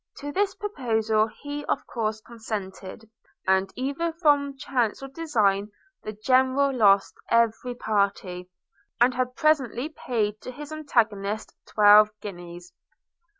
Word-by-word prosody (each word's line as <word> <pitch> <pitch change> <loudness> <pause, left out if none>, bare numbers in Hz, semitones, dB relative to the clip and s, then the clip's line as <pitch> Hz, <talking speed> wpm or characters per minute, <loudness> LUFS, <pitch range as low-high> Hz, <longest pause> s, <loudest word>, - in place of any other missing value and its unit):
To 290 +1 -6
this 390 +4 0
proposal 225 - 0
he 290 +6 -7
of - - -2
course 220 -2 -3
consented, 215 -2 -7 0.4
and, 190 0 +2
either 280 +6 -2
from 290 -4 +1
chance 250 -3 -1
or - - -5
design, 215 -10 0 0.3
the 215 - -5
General 260 +5 +2
lost 200 -4 +4 0.2
every 230 +1 +1
party, 200 -5 -1 0.5
and 245 +2 +4
had 250 0 -2
presently 285 -3 +1
paid 215 -8 -2
to - - -8
his 290 +4 -9
antagonist 220 -9 -1
twelve 210 0 +6
guineas. 175 -2 -9
230 Hz, 120 wpm, -25 LUFS, 205-275 Hz, 0.5 s, twelve